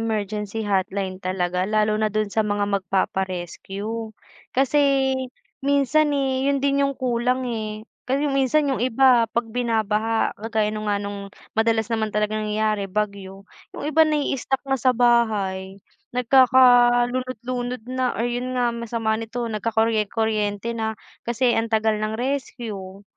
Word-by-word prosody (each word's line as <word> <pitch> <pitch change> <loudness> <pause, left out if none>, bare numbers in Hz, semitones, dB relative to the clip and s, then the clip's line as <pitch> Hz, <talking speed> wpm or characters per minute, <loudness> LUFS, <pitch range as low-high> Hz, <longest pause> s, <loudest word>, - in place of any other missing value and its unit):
emergency 215 -1 -2
hotline 190 0 -1
talaga, 180 -1 -1
lalo 215 0 +3
na 215 - +2
dun 215 -1 0
sa 220 - +1
mga 205 0 +1
magpapa-rescue. 190 +2 -2 0.6
Kasi 270 +2 +3 0.9
minsan 285 +2 +3
e, 270 -1 0
'yun 280 0 +2
din 280 0 +2
yung 275 - -3
kulang, 250 +1 +1 0.2
eh. 215 0 -4 0.4
Kasi 270 +3 0 0.2
minsan 280 +3 +2
yung 255 - -1
iba 250 -1 +5
pag 235 -1 0
binabaha 225 -2 0
kagaya 220 -2 0 0.2
nga 205 -1 +1
nung 200 0 -5 0.4
madalas 225 -1 +2
naman 220 -2 -1
talagang 215 0 0
nangyayari 210 -1 0
bagyo, 200 -1 -3 0.4
'yung - - -6
iba 320 +1 +5
naii-stock 280 -3 -1
na 270 0 +1
sa 255 +2 +3
bahay, 205 -6 +1 0.3
nagkaka 255 +1 +5 0.5
lunod 255 -1 -3
lunod 245 -2 -3 0.2
na, 255 -1 +1
or 230 - -2
'yun 250 +1 -3
nga 245 -1 +2
masama 230 -1 -2
nito 225 +2 -4
nagkakorye 220 0 +1
kuryente 215 0 -1
na 220 -1 -2 0.3
kasi 240 +2 +2
ang 225 - 0
tagal 220 -1 +1
ng 215 0 -2
rescue. 225 -6 -4
225 Hz, 140 wpm, -23 LUFS, 210-250 Hz, 0.9 s, iba